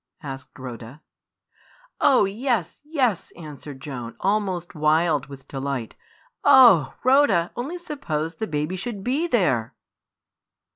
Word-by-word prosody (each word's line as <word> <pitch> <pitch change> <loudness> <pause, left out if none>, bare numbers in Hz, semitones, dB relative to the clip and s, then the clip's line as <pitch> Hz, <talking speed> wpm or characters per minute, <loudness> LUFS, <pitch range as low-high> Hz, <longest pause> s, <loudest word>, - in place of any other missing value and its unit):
asked 135 -1 -8
Rhoda. 125 +2 -9 1.0
"Oh, 260 -7 +5
yes, 210 - -2
yes!" 265 - 0
answered 150 -4 -10
Joan, 125 -5 -7
almost 195 -4 -1
wild 155 -2 +2
with 135 -1 -12
delight. 135 -4 -4 0.5
"Oh! 195 - +7
Rhoda, 255 -10 +4
only 280 +9 -4
suppose 170 - -4
the 220 +6 -4
baby 150 +3 -2
should 200 +1 -5
be 280 - 0
there!" 145 - +1
170 Hz, 110 wpm, -24 LUFS, -, 1.0 s, Oh